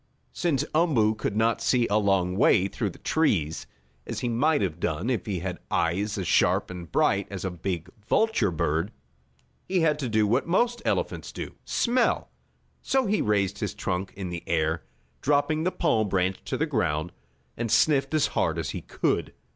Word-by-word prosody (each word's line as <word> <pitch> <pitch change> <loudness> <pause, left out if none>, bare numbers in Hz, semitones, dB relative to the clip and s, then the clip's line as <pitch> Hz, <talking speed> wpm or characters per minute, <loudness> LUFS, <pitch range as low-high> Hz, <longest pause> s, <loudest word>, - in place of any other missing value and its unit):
Since 160 -7 0
Umboo 145 -10 +3
could 105 -1 -3
not 115 +1 +2
see 120 0 +2
a 105 +1 +2
long 95 -3 +1
way 95 -1 +4
through 105 +1 -2
the - - -12
trees, 90 - 0 0.4
as - - -4
he 120 - -1
might 145 +4 +2
have 85 -3 -2
done 85 +10 -1
if 120 - -2
he 95 -5 -2
had 90 -1 -4
eyes 100 +6 0
as 95 -3 -3
sharp - - +2
and 85 -3 -8
bright 100 0 +2
as 95 -2 -5
a 95 - -1
big 85 -1 -4 0.2
vulture 220 - +2
bird, 80 +2 -1 0.8
he 185 -2 +2
had 150 -2 +2
to 130 -4 -2
do 110 -1 +3
what 120 +9 +1
most 235 +7 +1
elephants - - -1
do - - -6
smell. 245 0 +1 0.5
So 265 -1 +1
he 210 0 +1
raised 100 -2 +1
his 105 - -3
trunk 95 0 -3
in 95 -2 -5
the 85 -1 -5
air, 80 0 0 0.4
dropping 150 +3 +1
the 185 - +2
palm 110 - +1
branch 95 0 0
to - - -2
the 160 - +1
ground, 85 - -1 0.4
and 115 -2 -3
sniffed 145 +4 +3
as 155 - +3
hard - - +1
as - - -2
he - - -5
could. - - -1
105 Hz, 185 wpm, -26 LUFS, 90-145 Hz, 0.8 s, way